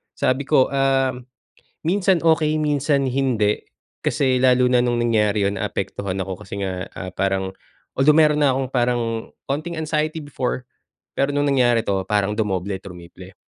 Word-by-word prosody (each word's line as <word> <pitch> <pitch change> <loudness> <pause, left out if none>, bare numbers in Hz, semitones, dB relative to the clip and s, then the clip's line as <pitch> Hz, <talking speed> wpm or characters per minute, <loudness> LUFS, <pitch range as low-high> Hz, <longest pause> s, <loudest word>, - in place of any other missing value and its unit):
Sabi 130 +2 0
ko 135 -4 +3
ah, 135 -1 +2 0.7
"Minsan 185 +1 +2
okey, 155 -1 +3
minsan 145 -1 +1
hindi" 120 -6 +1 0.4
Kasi 130 -3 +1
lalo 125 0 +4
na 125 - +4
nung 120 -1 0
nangyari 105 -3 +2
'yon 100 0 -1
naapektuhan 100 -2 -3
ako 95 +1 -7
kasi 100 +1 -5
nga 95 -1 -3
ah, 95 - -6
parang 95 +1 -1 0.5
although 145 +3 +5
meron 150 -1 +4
na 140 -3 +3
'kong 130 -1 -2
parang 120 -2 +1 0.5
konting 155 +5 -2
anxiety 155 0 -1
before. 130 -3 -3 0.5
Pero 140 - 0
no'ng 145 0 +1
nangyari 120 -3 +3
'to, 95 -1 0
parang 105 -1 +1
dumoble, 100 -3 -2
trumiple 90 0 -12
130 Hz, 150 wpm, -21 LUFS, 100-145 Hz, 0.7 s, although